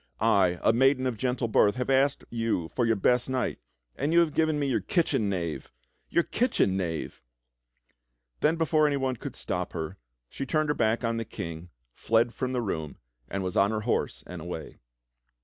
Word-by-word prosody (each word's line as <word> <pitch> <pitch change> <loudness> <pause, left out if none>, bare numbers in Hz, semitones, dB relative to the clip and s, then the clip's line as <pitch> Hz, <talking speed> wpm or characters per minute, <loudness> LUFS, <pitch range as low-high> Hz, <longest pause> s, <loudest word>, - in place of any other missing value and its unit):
I, 90 -3 +3
a 110 - +5
maiden 130 +2 +3
of 125 -2 0
gentle 125 +1 -1
birth, 105 -2 +4
have 125 +1 -1
asked 135 +1 +2
you 115 -8 -1
for 120 -2 0
your 115 - +3
best 125 +5 +2
knight, 130 -1 -1 0.4
and 145 +3 -1
you 170 - +5
have 160 -3 +1
given 160 -1 +2
me 145 - 0
your 135 -3 +1
kitchen 160 - +1
loiave! 85 -5 -3 0.2
— - - -45
Your 170 - +3
kitchen 230 - +1
knave!" 85 -4 -3 1.2
Then 155 +2 +3
before 155 -2 +3
anyone 135 -3 0
could - - -7
stop - - -3
her, 80 +4 -4 0.3
she 135 - -6
turned 155 0 +1
her - - +3
back 115 -2 +1
on 115 0 0
the 115 - -1
King, 85 -4 -7 0.2
fled 115 +1 +1
from 130 -1 -2
the 125 -2 -1
room, 80 -8 -4 0.3
and 100 0 -3
was 90 -1 -3
on 100 +1 +4
her 110 -1 -1
horse 115 - -1
and 90 -2 -8
away. 80 -1 -7
115 Hz, 190 wpm, -28 LUFS, 95-135 Hz, 1.2 s, a